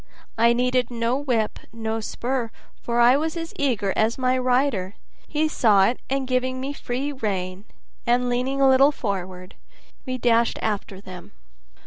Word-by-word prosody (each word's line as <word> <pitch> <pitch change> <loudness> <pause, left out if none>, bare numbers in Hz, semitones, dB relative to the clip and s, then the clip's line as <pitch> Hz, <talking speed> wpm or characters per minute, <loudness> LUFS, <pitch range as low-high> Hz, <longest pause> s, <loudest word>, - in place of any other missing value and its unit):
I 235 +1 +4
needed 250 0 +1
no 235 0 -1
whip, 245 -6 -1
no 225 0 -3
spur, 240 +2 -3 0.3
for 235 0 -1
I 240 +2 +6
was 315 +3 -2
as 330 0 -5
eager 220 -9 0
as 220 +2 +1
my 255 -1 +1
rider; 250 -6 +1 0.3
he 310 +1 0
saw 215 -10 +4
it, 240 - 0
and 270 -1 -1
giving 255 0 0
me 270 +2 -3
a - - -6
free 270 +1 -3
rein, 195 -6 -3 0.4
and 245 +1 +2
leaning 250 +3 -1
a 270 - +5
little 265 +2 +6
forward, 185 -7 -5 0.5
we 255 0 -2
dashed 235 -1 +2
after 200 -2 -3
them. 185 +1 -11
245 Hz, 160 wpm, -23 LUFS, 220-260 Hz, 0.5 s, I